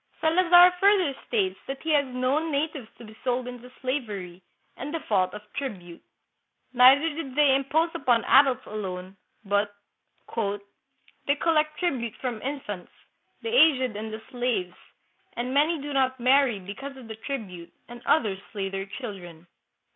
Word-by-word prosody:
Salazar 350 +2 +6
further 390 -6 +4
states 195 -5 0
that 270 0 -6
he 320 - -1
has 290 -2 +4
known 255 +5 0
natives 285 -4 -2
to - - -12
be 215 0 -13
sold 250 0 -1
into 250 0 -9
slavery, 210 -10 -4 0.3
in 280 - -6
default 200 - 0
of 210 +1 -9
tribute. 185 -11 -6 0.7
Neither 260 +5 +7
did 290 -4 -6
they 290 -2 +5
impose 305 +5 +1
upon 245 -9 +2
adults 265 -2 +5
alone, 190 -3 -6 0.3
but 205 +1 0 0.3
" - - -19 0.9
they 285 - +3
collect 305 -1 +1
tribute 255 - -2
from 245 -4 -4
infants, 255 -9 -5 0.5
the 455 - -2
aged 275 - +4
and 215 +1 -5
the 220 0 -7
slaves, 240 -8 -1 0.6
and 245 +2 -3
many 305 +3 +2
do 290 +1 -5
not 260 -1 +1
marry 255 -2 +4
because 265 +9 -8
of 250 -3 -11
the 220 - -7
tribute, 210 -9 -6 0.2
and 240 0 -11
others 210 -11 +2
slay 195 -2 -3
their 195 0 -4
children." 185 -7 -8
255 Hz, 150 wpm, -26 LUFS, 210-285 Hz, 0.9 s, Neither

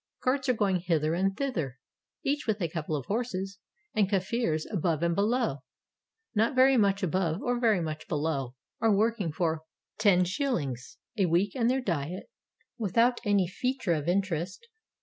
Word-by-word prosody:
Carts 260 +1 +1
are - - +5
going 200 -5 +1
hither 165 -3 0
and 190 +3 0
thither, 165 - -2 0.5
each 285 -1 -1
with 215 -1 +1
a 170 - 0
couple 160 -1 -3
of 140 -4 -4
horses, 200 -3 -3 0.3
and 205 -3 +2
Kafirs 190 -4 0
above 170 -4 0
and 170 0 +2
below, 215 - +1 0.4
— - - -62 0.3
not 225 +4 +2
very 260 +1 +6
much 200 -4 +2
above 180 -1 0
or 245 -1 0
very 220 -6 +3
much 155 -1 -5
below, 145 -5 -2
— - - -45
are 225 0 +4
working 215 -4 +1
for 160 0 -1 0.4
los. 180 - +1 0.2
a 195 - +4
week 180 +4 +1
and 235 -2 +2
their 260 +1 +1
diet 175 - -3 0.5
without 230 +4 +2
any 200 -2 +3
fea 250 +9 -2
ture 200 -10 0
of 155 -1 -2
interest. 185 - -1
190 Hz, 170 wpm, -29 LUFS, 165-230 Hz, 0.5 s, very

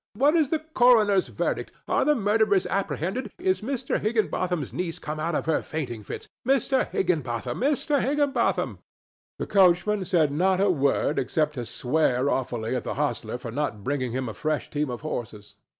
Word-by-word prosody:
"What 280 +7 +4
is 310 -5 +3
the 320 - +2
coroner's 240 -10 +4
verdict? - - -2 0.2
Are - - +2
the 300 - +3
murderers 210 -3 +2
apprehended? 195 - -2
Is 375 -3 0
Mr. 255 +3 -2
Higginbotham's 185 - -1
niece 175 -2 -3
come 155 +1 -5
out 165 +1 -1
of - - -1
her 160 -1 +1
fainting 130 -8 -5
fits? 105 - -7 0.2
Mr. 265 0 +2
Higginbotham! 130 - -1
Mr. 285 +1 +1
Higginbotham!" 285 0 0 0.6
The - - -3
coachman 195 +1 +3
said 160 -5 +2
not 185 +5 +2
a 200 0 +4
word 140 -1 +1
except 150 +4 0
to 120 -5 -5
swear 130 0 +1
awfully 120 -2 -2
at 125 - -2
the - - -4
hostler 130 -5 -2
for 120 -2 -7
not 120 -6 -3
bringing 130 -2 -1
him 130 +1 -2
a 110 - -5
fresh 155 +4 -2
team 150 -1 -1
of 120 - -5
horses. 115 -8 -6
170 Hz, 170 wpm, -26 LUFS, 135-220 Hz, 0.6 s, What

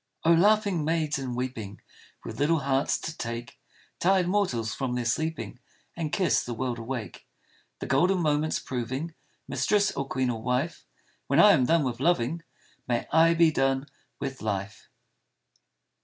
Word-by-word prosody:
Oh, 165 - +6
laughing 200 -1 +3
maids 155 -2 0
and 130 -2 -4
weeping, 115 -5 -5 0.4
With - - -8
little 155 +2 +2
hearts 135 0 +1
to 160 - -5
take 115 -1 -6 0.4
Tired 185 0 +3
mortals 150 - 0
from 130 -3 -2
their 125 -1 -2
sleeping 155 +2 -2 0.4
And 160 -3 -3
kiss 185 -3 +2
the 120 - -5
world 125 0 -3
awake, 115 -1 -6 0.5
The - - -6
golden 180 +8 +3
moments 155 -2 +1
proving 130 +6 -4 0.3
Mistress 205 -1 +1
or 140 0 -4
queen 130 -2 0
or 115 -2 -5
wife, 125 +7 -2 0.4
When - - +2
I 210 - +9
am 130 -9 +3
done 165 -2 +3
with 125 -3 -3
loving, 160 0 +1 0.5
May 120 -1 0
I 165 +1 +5
be 165 -1 +5
done 135 -1 +1 0.3
with 135 -2 -5
life 100 -2 -4
140 Hz, 155 wpm, -27 LUFS, 125-165 Hz, 0.5 s, I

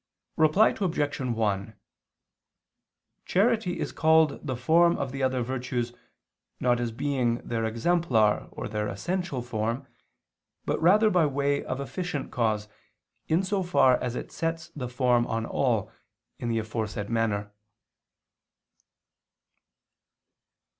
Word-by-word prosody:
Reply 160 +8 +5
Obj. 160 -8 -1
1: 110 -5 -1 1.5
Charity 210 -2 +1
is - - -2
called 160 -2 +3
the 130 -4 -2
form 170 +7 +4
of 135 -2 -3
the 135 +1 -5
other 130 -1 +1
virtues 125 -1 -3 0.7
not 120 -1 +2
as 120 -1 -2
being 125 -1 0
their 115 -1 -1
exemplar 115 -3 +2
or - - -5
their 105 -1 -2
essential 135 - -3
form, 115 +2 -2 0.8
but - - -1
rather 210 +6 +5
by 175 -4 +4
way 140 0 0
of 130 - -4
efficient 145 0 -4
cause, 110 -3 0 0.6
in 165 +4 +2
so 195 +1 0
far 155 -8 +3
as 125 -1 -2
it - - -6
sets 165 0 -3
the 125 -4 -6
form 125 -1 +2
on 115 0 -2
all, 115 -5 0 0.5
in 120 - -3
the 115 - 0
aforesaid 110 -2 -3
manner. 105 -3 0
130 Hz, 120 wpm, -27 LUFS, 115-160 Hz, 1.5 s, Reply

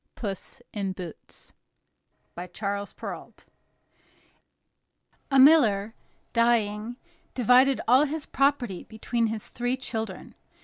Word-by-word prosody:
PUSS 205 +2 -6
IN 195 -3 -2
BOOTS 180 -3 -10 0.8
By 175 +1 -7
Charles 200 +2 -4
Perrault - - -9 1.8
A 275 - +2
miller, 230 -8 +5 0.4
dying, 230 -1 +1 0.4
divided 255 +2 +4
all 255 +5 +6
his 300 0 -4
property 275 -9 0
between 230 +1 -1
his 220 -1 -5
three 245 +2 -2
children. 225 -6 -5
225 Hz, 95 wpm, -26 LUFS, 200-255 Hz, 1.8 s, all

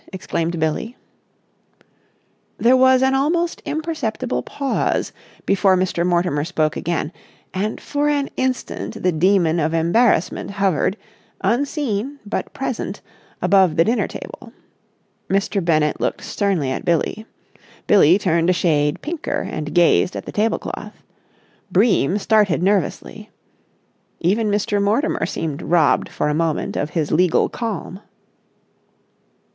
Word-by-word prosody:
exclaimed 170 -2 -3
Billie. 160 +10 -2 1.6
There 245 +2 +4
was 260 0 +5
an 265 0 +3
almost 335 +5 0
imperceptible 295 -6 -2
pause 275 -2 -1 0.3
before 190 -1 +3
Mr. 180 -2 0
Mortimer 175 -4 +1
spoke 155 -2 -1
again, 165 -2 -2 0.4
and 205 +3 -2
for 290 0 -1
an 285 -1 0
instant 260 -1 -3
the 180 - +3
demon 175 0 +2
of 160 +1 0
embarrassment 175 +3 +2
hovered, 195 -1 0 0.4
unseen 260 - -1
but 205 - -4
present, - - -4 0.4
above 190 -5 +4
the 165 - +5
dinner 230 +7 +1
table. - - -10 0.8
Mr. 195 0 0
Bennett 155 -3 +1
looked - - -2
sternly 185 -10 -1
at - - -3
Billie; 175 +6 -1 0.6
Billie 185 -3 +5
turned 170 -4 +1
a - - +5
shade 150 -4 +1
pinker 315 0 -3
and 150 +1 -5
gazed 175 +1 +4
at - - -5
the - - -7
tablecloth; 215 +2 -3 0.7
Bream 195 - +3
started 205 -5 +2
nervously. 195 -3 -1 0.9
Even 210 +5 +1
Mr. 205 0 0
Mortimer 220 +10 +1
seemed 155 -3 -4
robbed 165 -3 +2
for - - -2
a 150 - +1
moment 160 0 -1
of 145 - -1
his 155 -2 -2
legal 175 +1 +3
calm. 215 -5 -5
190 Hz, 120 wpm, -20 LUFS, 165-230 Hz, 1.6 s, was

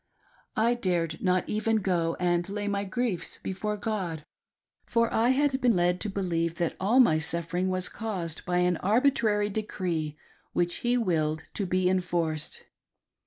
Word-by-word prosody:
I 230 +2 +3
dared 175 -8 -1
not 185 -1 +1
even 220 +1 0
go 175 -5 0
and 175 0 +1
lay 205 +1 -3
my 200 0 -1
griefs 200 -1 -2
before 210 +3 -3
God, 190 -8 -3 0.6
for 230 -1 +1
I 230 +2 +3
had 270 0 +2
been 240 -4 +4
led 175 0 +2
to 215 - -1
believe 170 -4 -1
that 170 -2 -1
all 215 +7 +3
my 160 -11 +5
suffering 170 +3 -2
was 185 -1 0
caused 185 -8 -4
by 180 0 0
an 180 -1 +2
arbitrary 215 -1 +2
decree 175 -7 -2 0.4
which 175 0 0
He 245 +1 +1
willed 160 -8 0
to 200 - -2
be 185 +1 +2
enforced. 170 -4 -1
185 Hz, 155 wpm, -28 LUFS, 170-215 Hz, 0.6 s, my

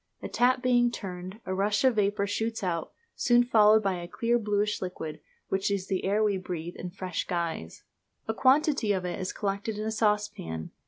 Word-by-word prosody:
A - - -2
tap 250 +1 +2
being 245 -1 +4
turned, 185 -2 -7
a 185 - -2
rush 205 +3 +1
of 255 -4 +3
vapour 200 0 +2
shoots 220 +2 -2
out, 170 -3 -2 0.2
soon 240 0 +4
followed 220 -2 +5
by 190 -3 0
a 175 - -7
clear, 235 +6 +1
bluish 210 -1 0
liquid, 170 -4 -5 0.3
which 195 +1 0
is 200 -2 -1
the 190 -1 -2
air 205 +3 +2
we 205 -2 +2
breathe 175 -2 -5
in 180 - -6
a - - -5
fresh 185 0 -4
guise. 165 - -3 0.4
A 220 - 0
quantity 270 -3 +3
of 185 -2 -2
it 175 +1 -3
is 185 -1 -2
collected 205 +1 -3
in 215 - -3
a 220 - -1
saucepan. 210 - -1
205 Hz, 200 wpm, -28 LUFS, 185-220 Hz, 0.4 s, followed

